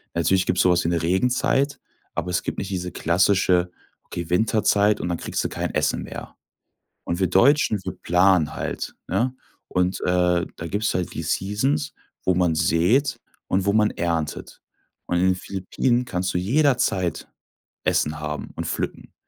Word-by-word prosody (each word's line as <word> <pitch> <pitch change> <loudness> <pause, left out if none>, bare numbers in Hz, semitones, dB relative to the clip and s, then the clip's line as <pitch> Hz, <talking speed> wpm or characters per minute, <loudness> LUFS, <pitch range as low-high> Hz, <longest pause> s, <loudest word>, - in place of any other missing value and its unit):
Natürlich 95 +3 +2
gibt's 90 - +2
so 90 - +4
was 90 0 +2
wie 85 - 0
eine 85 -1 0
Regenzeit, 125 - +1 0.3
aber 85 +2 -3
es 90 - 0
gibt - - -4
nicht 100 - -4
diese 90 -1 -3
klassische, 90 +1 +2 0.3
okay, 85 -2 -6
Winterzeit 105 +1 +3
und - - -2
dann 85 - -1
kriegst - - -3
du - - -1
kein - - -3
Essen - - 0
mehr. - - -9 0.7
Und 85 - -3
wir 95 - +2
Deutschen, 110 - +4
wir 95 -1 -4
planen 90 -2 +3
halt, - - -4
ne? 120 +8 0 0.3
Und, 90 +1 0
äh, 90 -1 +2
da 85 - -6
gibt's 105 +5 -1
halt 90 -1 -2
die 80 - -4
Seasons, 80 -4 -1 0.3
wo 95 - +3
man 90 -3 +2
säht 115 - +2 0.3
und 95 0 0
wo 100 - +2
man 105 0 +3
erntet. 85 -3 -3 0.5
Und 90 - 0
in 90 - +2
den 95 - +3
Philippinen 100 +7 -1
kannst 90 -5 -2
du - - 0
jederzeit 110 - +1 0.6
Essen 75 +1 +1
haben 75 -1 -5
und - - -4
pflücken. - - -4
90 Hz, 170 wpm, -23 LUFS, 85-100 Hz, 0.7 s, so